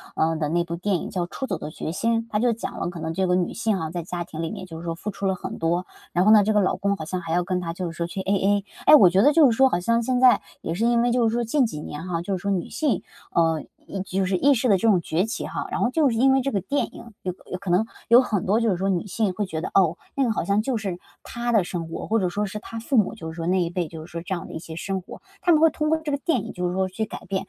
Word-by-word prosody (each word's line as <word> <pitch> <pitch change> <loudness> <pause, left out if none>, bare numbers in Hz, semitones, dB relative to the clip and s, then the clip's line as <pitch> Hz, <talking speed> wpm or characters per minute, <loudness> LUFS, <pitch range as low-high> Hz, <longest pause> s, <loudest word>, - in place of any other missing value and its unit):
呃， 160 +1 +2
的 155 -1 -1
那 170 +3 +1
部 170 0 -5
电 195 +3 0
影 170 - -3
叫 180 -2 -2
《出 265 - -4
走 190 -8 -2
的 155 - -6
决 155 0 -5
心》， 230 +6 +1
它 210 - 0
就 240 +1 +2
讲 225 - -6
了 - - -2
可 175 -2 -8
能 160 - -3
这 190 +2 0
个 180 - +3
女 180 -1 0
性 220 -3 0
哈， 160 -3 -3
在 175 0 -4
家 175 +1 -4
庭 160 -1 -7
里 165 - -2
面 185 - -6
就 165 -3 -9
是 170 - -9
说 165 -1 -2
付 210 +5 -5
出 200 - -5
了 190 -1 +2
很 - - -6
多， 170 +2 0 0.3
然 175 - +3
后 210 - +6
呢， 215 -2 +7
这 215 - +2
个 210 - +4
老 185 - +1
公 200 0 0
好 160 - -7
像 180 +3 -3
还 165 -2 -4
要 180 +1 +2
跟 180 0 -1
她 165 -2 -4
就 175 -1 -4
是 170 - -13
说 170 - -1
去 190 +2 -5
AA。 200 +1 +1 0.2
哎， 305 - +9
我 195 -11 +8
觉 185 +3 +3
得 290 +7 +5
就 295 -6 +6
是 225 - -2
说 265 - +6
好 175 -9 0
像 230 +5 +2
现 250 +1 0
在 255 -1 +6 0.2
也 165 - -3
是 210 +7 0
因 235 0 +3
为 240 - +2
就 240 -1 +3
是 220 - 0
说 240 - +1
近 255 +4 +2
几 150 -10 -5
年 150 +3 -7
哈， 170 -2 -2
就 190 +2 -2
是 - - -10
说 200 - -2
女 180 -3 -1
性， 285 - 0 0.3
呃， 165 -2 +2 0.2
意 195 - -6
就 190 0 -1
是 185 0 +1
意 280 +8 +4
识 250 -1 +1
的 195 - +5
这 205 - 0
种 190 -6 +4
崛 165 +4 0
起 225 - -4
哈。 - - -4
然 - - -2
后 245 - +3
就 295 +1 +3
是 230 - -1
因 265 +3 +5
为 265 0 +4
这 275 +2 -1
个 200 - +1
电 285 +9 0
影 235 - -11
有 180 - -2 0.2
有 185 - -2
可 200 -1 -6
能 180 +5 +3 0.2
有 235 +2 +8
很 210 -7 -1
多 205 +4 +3
就 230 - +2
是 180 - 0
说 190 +2 -1
女 185 -1 0
性 205 -1 0
会 205 +3 -2
觉 165 -4 -4
得， 160 - -4
哦， 180 -3 +3 0.2
那 275 - +2
个 240 - +2
好 220 - -1
像 200 +1 +2
就 245 +1 -1
是 195 -5 -3 0.3
她 240 0 -3
的 220 -5 +4
生 175 -2 -4
活， - - -5
或 225 +1 +2
者 185 -3 0
说 205 +4 -1
是 210 +1 -5
她 230 +2 -7
父 250 +4 0
母 210 - +3
就 165 -8 -8
是 - - -11
说 165 -1 -4
那 185 +1 +2
一 170 - 0
辈 175 -1 -2
就 160 0 -9
是 - - -16
说 170 - -5
这 190 +3 -4
样 175 - -7
的 - - -10
一 - - -4
些 160 0 -9
生 190 +3 -3
活。 - - -11 0.2
她 350 - +3
们 310 -2 +5
会 325 - +7
通 305 0 -2
过 320 - +3
这 315 -2 -4
个 285 - +1
电 275 - 0
影 - - -7
就 180 -1 -2
是 175 - -2
说 190 0 0
去 220 +4 -3
改 - - -8
变， 190 -1 -2
你 - - -37
195 Hz, 370 characters per minute, -24 LUFS, 175-230 Hz, 0.3 s, 哎